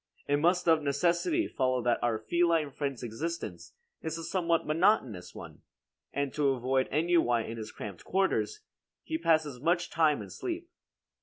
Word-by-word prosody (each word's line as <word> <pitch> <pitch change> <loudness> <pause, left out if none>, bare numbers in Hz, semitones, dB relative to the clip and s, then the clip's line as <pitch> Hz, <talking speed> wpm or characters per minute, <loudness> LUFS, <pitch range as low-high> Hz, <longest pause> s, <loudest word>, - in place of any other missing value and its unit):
It 145 - +3
must 175 +4 +2
of 160 -1 +5
necessity 170 - +1
follow 130 -2 0
that 120 -1 +2
our 120 -2 +1
feline 165 +4 +1
friend's 140 -3 -4
existence 155 +9 -5 0.3
is 160 0 -3
a 165 - -6
somewhat 170 -1 0
monotonous 155 - +1
one, - - -10 0.5
and 140 -1 -2
to 145 -2 +2
avoid 130 +1 0
ennui 150 -7 +2
in 115 - -6
his 110 -1 -6
cramped 100 -4 -8
quarters, 195 - 0 0.4
he 320 0 -3
passes 155 - +1
much 170 +3 +1
time 155 -7 +2
in 95 - -11
sleep. 345 0 -5
155 Hz, 155 wpm, -30 LUFS, 130-170 Hz, 0.5 s, of